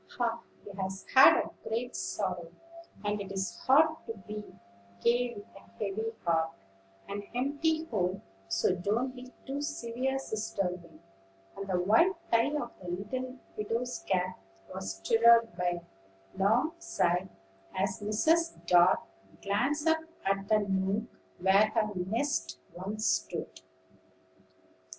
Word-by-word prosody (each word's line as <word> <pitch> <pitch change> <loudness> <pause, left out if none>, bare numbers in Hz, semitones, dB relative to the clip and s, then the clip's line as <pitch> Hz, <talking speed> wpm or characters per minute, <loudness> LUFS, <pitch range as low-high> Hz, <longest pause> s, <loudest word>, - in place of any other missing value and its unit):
"Ah! 230 -1 0 0.2
he 205 - -9
has 190 0 -4
had 265 +1 +9
a - - -3 0.2
great 240 +3 -2
sorrow, 180 -4 -3 0.5
and 205 0 0
it 195 - -7
is 195 0 -2
hard 310 +4 +5
to 225 - -4
be 210 0 -5 0.6
gay 240 0 +2
with 205 - -9
a - - -11 0.2
heavy 215 +2 -2 0.2
heart, 165 -1 +2 0.5
an 200 +1 -4
empty 305 +5 +1
home; 190 - -1 0.2
so 95 - +2
don't 215 +8 -1
be 250 0 -10
too 275 +2 -3
severe, 260 -1 -2
Sister 215 -6 -2
Wing." 170 -2 -12 0.5
And 195 0 -6
the 185 -2 +1
white 225 - +5 0.2
tie 230 +3 +4
of 240 -5 -2
the 180 - -9
little 250 +8 -4 0.2
widow's 230 +4 -2
cap 185 -1 0 0.3
was 95 0 -4
stirred 230 - +5
by 175 -1 0
a - - -18 0.5
long 225 +10 +3
sigh 180 - 0 0.5
as 195 +2 0
Mrs. 320 +11 +2
Dart 175 +1 +5 0.4
glanced 270 +10 0
up 320 0 +4 0.3
at 195 0 0
the 215 -1 +4
nook 195 +2 +1 0.3
where 195 +3 +5
her 215 -1 +2
nest 215 +11 -1 0.2
once 205 +4 -4
stood. - - -1
210 Hz, 135 wpm, -30 LUFS, 190-245 Hz, 0.6 s, had